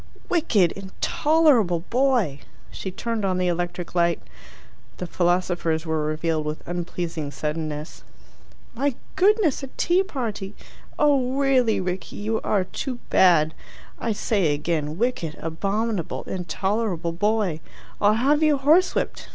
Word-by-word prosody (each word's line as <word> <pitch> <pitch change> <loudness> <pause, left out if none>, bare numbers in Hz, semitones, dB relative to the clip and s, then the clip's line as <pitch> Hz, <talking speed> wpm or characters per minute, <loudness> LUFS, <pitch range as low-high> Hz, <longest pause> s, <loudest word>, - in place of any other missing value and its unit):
"Wicked, 230 - +3
intolerable 220 - +2
boy!" 240 - +2 0.3
She 190 - -5
turned 225 +3 -3
on 185 -2 +1
the 185 - 0
electric 175 0 -2
light. 170 -1 +2 0.8
The 180 - -4
philosophers 175 -2 0
were 160 -1 -1
revealed 155 +1 -1
with 150 +1 -5
unpleasing 170 -3 -3
suddenness. 150 +1 -4 0.7
"My 270 +2 0 0.2
goodness, 390 - +3
a 270 - -5
tea 350 +2 +3
party! 225 - -4 0.4
Oh 275 -4 +3
really, 265 -5 +3
Rickie, 185 0 -4
you 220 +2 -2
are 200 -3 +1
too 250 +7 -5
bad! 160 -4 +5 0.5
I 230 - -1
say 200 -7 +1
again: 150 0 -2
wicked, 205 -9 -1
abominable, 195 +4 -2
intolerable 190 0 -2
boy! 205 -3 0 0.4
I'll 205 +1 +5
have 280 +6 +3
you 305 -2 +4
horsewhipped. 315 +7 +2
190 Hz, 120 wpm, -24 LUFS, 170-250 Hz, 0.8 s, bad